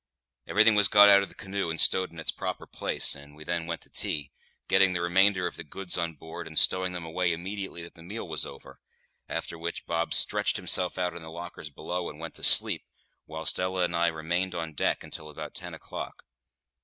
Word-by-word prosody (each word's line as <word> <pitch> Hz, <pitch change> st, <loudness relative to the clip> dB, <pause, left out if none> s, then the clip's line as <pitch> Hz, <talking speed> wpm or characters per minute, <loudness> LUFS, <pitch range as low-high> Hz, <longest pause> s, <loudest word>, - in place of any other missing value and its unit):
Everything 110 Hz, +2 st, +5 dB
was 105 Hz, -2 st, +7 dB
got 105 Hz, +1 st, +7 dB
out 100 Hz, 0 st, +7 dB
of 100 Hz, -, -5 dB
the -, -, -16 dB
canoe 100 Hz, -3 st, -4 dB
and 80 Hz, -, -3 dB
stowed 95 Hz, 0 st, +4 dB
in 85 Hz, -, -12 dB
its 80 Hz, -, -1 dB
proper -, -, -5 dB
place, -, -, 0 dB
and 70 Hz, +1 st, -13 dB
we 75 Hz, -, -11 dB
then 85 Hz, 0 st, -3 dB
went 85 Hz, -1 st, -4 dB
to -, -, -16 dB
tea, 75 Hz, -3 st, 0 dB, 0.4 s
getting 95 Hz, -1 st, +4 dB
the 90 Hz, -, -1 dB
remainder 95 Hz, +2 st, +3 dB
of -, -, -5 dB
the -, -, -6 dB
goods 90 Hz, +4 st, +1 dB
on 85 Hz, -2 st, -2 dB
board 80 Hz, +3 st, -9 dB
and 80 Hz, -1 st, -5 dB
stowing 95 Hz, 0 st, +3 dB
them 90 Hz, -2 st, -5 dB
away 85 Hz, +2 st, -1 dB
immediately 95 Hz, +1 st, -5 dB
that 85 Hz, -, -12 dB
the 85 Hz, -, -16 dB
meal 100 Hz, +5 st, -7 dB
was 80 Hz, -2 st, 0 dB
over; -, -, -11 dB, 0.5 s
after 85 Hz, -, -4 dB
which 85 Hz, +1 st, -5 dB
Bob 85 Hz, 0 st, -2 dB
stretched -, -, +2 dB
himself 90 Hz, 0 st, +2 dB
out 90 Hz, -1 st, -1 dB
on 85 Hz, -, -8 dB
the 80 Hz, -, -10 dB
lockers 85 Hz, -1 st, -8 dB
below, 90 Hz, +4 st, -5 dB
and 75 Hz, -, -12 dB
went 80 Hz, 0 st, -7 dB
to -, -, -9 dB
sleep, -, -, +7 dB, 0.4 s
whilst 80 Hz, +1 st, 0 dB
Ella 90 Hz, 0 st, 0 dB
and 85 Hz, -1 st, -1 dB
I 85 Hz, 0 st, +2 dB
remained 85 Hz, +3 st, -2 dB
on 80 Hz, -2 st, -4 dB
deck -, -, -1 dB
until 75 Hz, -1 st, -8 dB
about 75 Hz, -, -8 dB
ten -, -, -7 dB
o'clock. -, -, -9 dB
85 Hz, 220 wpm, -27 LUFS, 80-95 Hz, 0.5 s, was